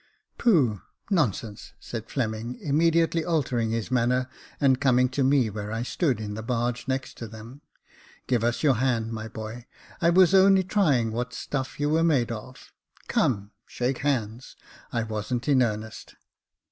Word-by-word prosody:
" - - -50
Pooh! 140 - +3 0.3
nonsense! 115 - -1
" - - -39
said 115 -1 -7
Fleming, 115 -1 -3
immediately 165 +1 +2
altering 130 -9 0
his 115 +2 -3
manner 125 +1 +1 0.3
and 135 -2 +3
coming 125 -2 +4
to 130 +2 0
me 135 -2 +3
where 105 0 -5
I 115 +1 -2
stood, 130 -1 0
in 105 -1 -5
the 110 - -5
barge 120 +1 -2
next 135 0 -3
to 115 - -5
them. 110 +6 -11 0.3
" - - -26
Give 120 -3 +1
us 120 +4 0
your 135 -6 +4
hand, 115 -3 0
my 110 0 -5
boy; 110 +2 -8 0.3
I 170 - +4
was 180 +1 +5
only 190 0 +6
trying 155 - +2
what 120 +2 -4
stuff 135 -1 -4
you 145 - +1
were 160 +2 +2
made 140 -8 +2
of. 115 +3 -9 0.3
Come, 100 -4 0 0.2
shake 125 +1 -2
hands; 125 -4 -2 0.4
I 115 -2 -1
wasn't 115 +4 -3
in 135 -3 +4
earnest." 110 -1 -3
125 Hz, 170 wpm, -26 LUFS, 115-145 Hz, 0.4 s, only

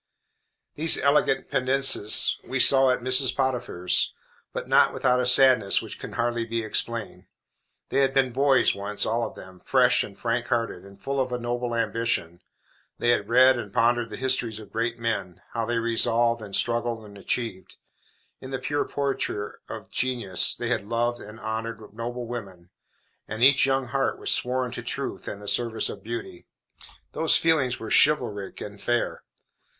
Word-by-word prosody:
These 160 +2 +5
elegant 140 -1 +1
Pendennises 130 -5 +3
we 135 - -2
saw 135 0 +6
at 125 - 0
Mrs. 130 +1 +3
Potiphar's, 125 -9 +1 0.4
but - - -6
not - - +4
without 125 -1 +1
a 125 - -1
sadness 125 -5 +5
which - - -9
can - - -8
hardly 120 0 -1
be 115 0 -3
explained. 110 0 -3 0.6
They - - 0
had 135 -1 +2
been 135 -2 +1
boys 135 0 +3
once, 100 +1 -1
all 115 +2 -1
of - - -13
them, 95 -1 -12
fresh - - +2
and 100 - -11
frank 120 0 -2
hearted, 115 -7 -2
and 100 0 -15
full 135 +6 -3
of 130 -1 -1
a 125 - -1
noble 120 0 -3
ambition. 115 -7 -2 0.6
They 120 - 0
had 105 -4 +1
read 130 +1 +5
and 105 -4 -7
pondered 120 +2 +1
the - - -7
histories 125 -4 -1
of 110 -1 -12
great 115 +1 -2
men; 115 -6 -4
how 115 -1 -3
they 120 0 -1
resolved, 115 0 +1
and 100 -2 -6
struggled, 120 -1 -1
and 100 -1 -14
achieved. 100 -1 -4 0.6
In 130 - -10
the 135 - -3
pure 145 +2 -2
portraiture 135 -7 -3
of - - -9
genius, 120 -8 +1
they 120 - -4
had 115 -5 -1
loved 120 +3 -2
and 105 +2 -11
honored 110 -1 -6
noble 120 +2 -5
women, 95 -7 -8 0.6
and 110 +2 -3
each 135 0 +6
young 135 -2 -1
heart 135 +1 -1
was - - -2
sworn 125 0 0
to - - -5
truth - - -5
and 100 - -6
the 105 - -11
service 115 +1 0
of 100 - -8
beauty. 115 -4 -7 0.6
Those 160 - +2
feelings 145 -7 +1
were 110 -1 -7
chivalric 120 -10 +2
and 100 -1 -8
fair. 120 0 -1
120 Hz, 170 wpm, -25 LUFS, 110-130 Hz, 0.6 s, saw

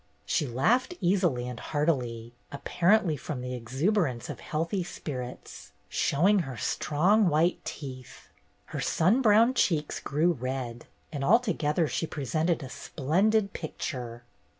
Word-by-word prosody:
She 175 -7 0
laughed 230 - +1
easily 175 -9 +1
and 125 -1 -6
heartily, 125 -7 -1 0.2
apparently 175 +5 +2
from 135 -1 -5
the 125 0 -4
exuberance 130 - -1
of - - -9
healthy 165 +5 -2
spirits, 125 -7 -7 0.2
showing 190 +8 +3
her 135 -8 -4
strong 180 - +2
white 165 +3 +1
teeth; 130 -4 -8 0.4
her - - -2
sun 190 +11 +2
browned 230 +2 +5
cheeks 155 - +1
grew 155 +5 +1
red, 130 -4 -4 0.2
and 145 -3 -4
altogether 175 - +2
she 165 - -2
presented 155 +4 -1
a - - -6
splendid 195 +12 0
pic 155 - -6
ture. 120 -3 -5
155 Hz, 125 wpm, -28 LUFS, 130-185 Hz, 0.4 s, browned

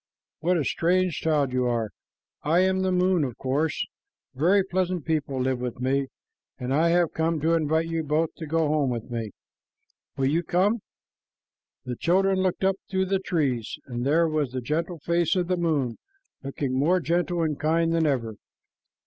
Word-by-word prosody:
What 175 +3 +2
a 155 - +1
strange 180 0 +1
child 145 -5 +1
you 125 -1 +1
are! 115 -3 -1 0.5
I 165 +4 +3
am 190 0 +2
the 190 0 +1
moon, 180 -2 +2
of 125 -5 -4
course. 145 +4 0 0.5
Very 185 +8 +3
pleasant 185 -3 -1
people 145 -4 -1
live 130 0 0
with 125 -1 -4
me, 135 +2 0 0.5
and 125 +1 -3
I 160 +4 +3
have 170 -1 +2
come 160 0 0
to 165 +2 +2
invite 160 0 +1
you 165 0 -1
both 155 +1 0
to 160 - -6
go 160 0 +1
home 150 -3 +1
with 120 0 -4
me. 115 -2 -3 0.9
Will 135 - +1
you 155 +5 +2
come?" 195 +7 +1 1.0
The 125 -1 -3
children 190 +2 +2
looked 185 0 0
up 190 0 +2
through 190 0 +1
the 195 -1 +2
trees, 140 - -1
and 120 -2 -4
there 160 +5 +3
was 150 -5 -1
the 130 - -1
gentle 165 +7 -2
face 170 +2 +1
of 180 -2 0
the 180 - +1
moon, 150 -9 0 0.4
looking 135 -1 -3
more 155 +8 +3
gentle 175 +1 0
and 155 -3 -1
kind 165 +2 +2
than 165 -1 +2
ever. 115 -7 -1
160 Hz, 180 wpm, -26 LUFS, 135-175 Hz, 1.0 s, I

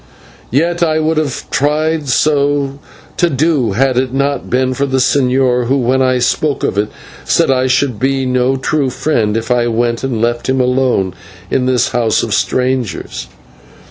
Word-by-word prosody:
Yet 170 +7 0
I 160 -2 +2
would 160 0 0
have 150 -4 -2
tried 155 +2 0
to 140 +1 +1 0.4
do 170 -5 +2
so 140 -6 +1
had 130 +3 +1
it 130 -1 -1
not 140 0 -1
been 130 +1 +1
for 140 +2 -1
the 130 -1 0
señor, 125 -2 +2
who, 135 +3 +2
when 130 +1 +1
I 130 -1 +2
spoke 140 +4 0
of - - 0
it, 105 +1 0 0.3
said - - +2
I 130 0 +1
should 125 -3 0
be 135 +1 0
no 125 +1 +1
true 135 +1 0
friend 115 -5 0
of 115 - -2
his - - -11
if 125 - -5
I 120 -1 +1
went 120 +1 -1
and 130 -4 -2
left 120 +2 -1
him 130 0 +1
alone 125 -7 +1 0.4
in 125 -1 +1
this 125 -2 +2
house 115 -2 +1
of - - -2
strangers. 125 - -1
130 Hz, 180 wpm, -14 LUFS, 125-140 Hz, 0.4 s, I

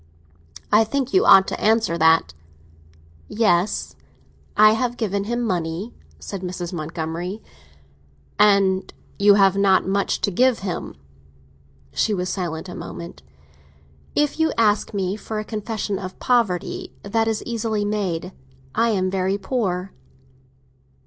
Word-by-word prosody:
I 215 +2 +6
think 270 +4 -2
you 380 - +4
ought 190 0 +8
to - - -5
answer 220 -5 +2
that." 160 - +3 0.9
"Yes, 205 -3 +1 0.6
I 215 0 +8
have 245 +1 -1
given 200 -3 -1
him 240 +2 -2
money," 180 +1 -3 0.2
said 195 -2 -7
Mrs. 180 -1 -5
Montgomery. 165 +4 -4 1.0
"And 200 -2 +3 0.3
you 200 0 +6
have 195 -1 +4
not 195 -1 +4
had 190 - -3
much 200 0 0
to 200 - +1
give 250 +4 +2
him?" 180 - -4 1.0
She 215 - +1
was 180 -1 -2
silent 170 -2 -4
a 180 - -8
moment. 170 - -8 0.9
"If 295 +1 +1
you 320 0 +3
ask 210 -2 +2
me 195 -1 -2
for 220 0 -6
a 215 - -3
confession 210 -2 -3
of 185 -1 -7
poverty, 230 -9 0
that 225 +2 0
is 220 -1 -1
easily 220 -3 -2
made. 190 -4 -2 0.4
I 230 +1 +2
am 185 -4 0
very 190 +1 0
poor." 195 -4 -2
200 Hz, 135 wpm, -22 LUFS, 185-220 Hz, 1.0 s, ought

